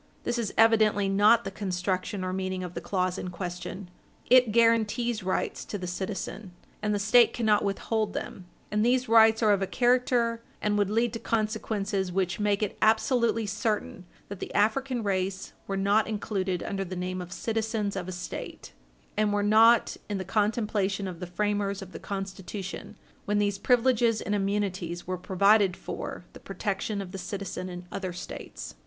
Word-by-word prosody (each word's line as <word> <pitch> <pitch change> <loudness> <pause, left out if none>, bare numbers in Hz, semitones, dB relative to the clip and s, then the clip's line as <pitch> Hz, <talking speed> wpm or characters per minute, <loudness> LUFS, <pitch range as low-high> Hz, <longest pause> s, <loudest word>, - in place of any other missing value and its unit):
This 240 0 -1
is 225 -4 -2
evidently 215 -3 +4
not 210 +4 +5
the 195 - -5
construction 185 0 -2
or 185 0 -2
meaning 185 0 -2
of 180 -1 -6
the - - -5
clause 185 -2 -1
in 185 - -4
question. 180 +1 -6 0.4
It 250 -3 +7
guaranties 230 0 +2
rights 185 0 -2
to 205 - -4
the 185 - -6
citizen, 190 +1 -5 0.3
and 210 0 0
the 205 - +1
State 220 +4 +5
cannot 215 -3 +2
withhold 210 +1 -1
them. 180 - -6 0.2
And 210 0 +1
these 250 +2 +2
rights 225 0 +6
are 215 - +5
of 200 - 0
a 195 - 0
character 240 -1 +2 0.2
and 210 0 0
would 205 -1 +2
lead 230 +2 +1
to 230 - -4
consequences 210 -4 -1
which 185 0 -1
make 205 0 +1
it 210 - -3
absolutely 230 +1 +3
certain 205 -2 -2 0.2
that 200 -2 -7
the - - -6
African 240 +3 +1
race 190 -1 -2
were 195 - -2
not 200 +3 +3
included 195 -4 -2
under 195 -1 -2
the 185 0 -6
name 180 0 -3
of 180 0 -9
citizens 220 -1 -2
of 185 -2 -4
a - - -4
State, 180 0 -7 0.4
and 210 0 +2
were 205 0 +1
not 225 +3 +5
in 205 - -1
the 190 - -4
contemplation 205 -1 0
of 175 -3 -7
the 180 - -5
framers 200 +1 -1
of 185 - -12
the - - -8
Constitution 195 -1 -6 0.3
when 210 -2 +1
these 205 -1 +1
privileges 240 -2 +3
and 205 - -3
immunities 195 -4 -1
were 185 0 -3
provided 195 +1 +3
for - - -6
the - - -11
protection 200 0 -3
of 180 - -10
the 195 - -6
citizen 185 0 -5
in 180 0 -8
other 185 -2 -4
States. 170 - -8
205 Hz, 175 wpm, -28 LUFS, 190-220 Hz, 0.4 s, It